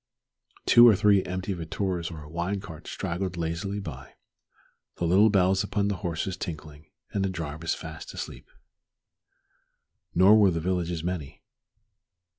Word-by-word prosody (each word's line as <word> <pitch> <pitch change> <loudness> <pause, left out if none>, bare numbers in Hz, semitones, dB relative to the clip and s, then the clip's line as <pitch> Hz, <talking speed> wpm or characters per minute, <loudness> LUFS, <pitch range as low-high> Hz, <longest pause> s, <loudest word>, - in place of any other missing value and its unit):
Two 120 0 +8
or 110 - +7
three 100 -1 +4
empty 95 +2 -3
vetturas 85 0 -3
or 80 -3 -8
a - - -12
wine 85 +5 -2
cart 85 -4 -10
straggled 90 -1 -3
lazily 85 +5 -3
by, 100 - -9 0.8
the 85 - -2
little 95 +6 +5
bells 95 -1 +3
upon 100 -1 0
the 100 - -2
horses 90 0 -3
tinkling, 75 -5 -7 0.2
and 100 - -1
the 95 - 0
drivers 80 -2 -3
fast - - -8
asleep. - - -8 1.7
Nor 95 +5 +7
were 100 -2 +6
the 85 -2 -1
villages 85 -1 -2
many. 85 -6 -5
90 Hz, 140 wpm, -27 LUFS, 85-100 Hz, 1.7 s, Two